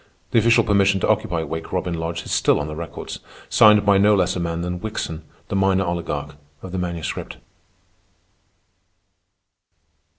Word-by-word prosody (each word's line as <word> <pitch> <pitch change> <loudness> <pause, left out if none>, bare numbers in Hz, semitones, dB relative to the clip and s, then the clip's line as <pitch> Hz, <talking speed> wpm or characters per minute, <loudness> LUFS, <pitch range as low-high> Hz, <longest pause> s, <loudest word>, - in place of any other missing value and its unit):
The 115 - +4
official 115 +1 +4
permission 100 -2 +3
to - - +1
occupy 85 -2 0
Wake 80 +1 -6
Robin 90 -1 -2
Lodge 85 0 -4
is - - -8
still - - +3
on 70 - -3
the 75 0 -6
records, 85 0 -7 0.3
signed 105 -1 +6
by 100 -1 +5
no 105 +1 +5
less 95 -1 +1
a - - -2
man 85 -1 -2
than 90 0 -3
Wickson, 90 -6 -4 0.3
the - - -2
minor 95 0 +2
oligarch 75 -4 -4 0.3
of 95 - -8
the 95 - -3
Manuscript. 85 -2 -4
90 Hz, 160 wpm, -22 LUFS, 85-100 Hz, 0.3 s, signed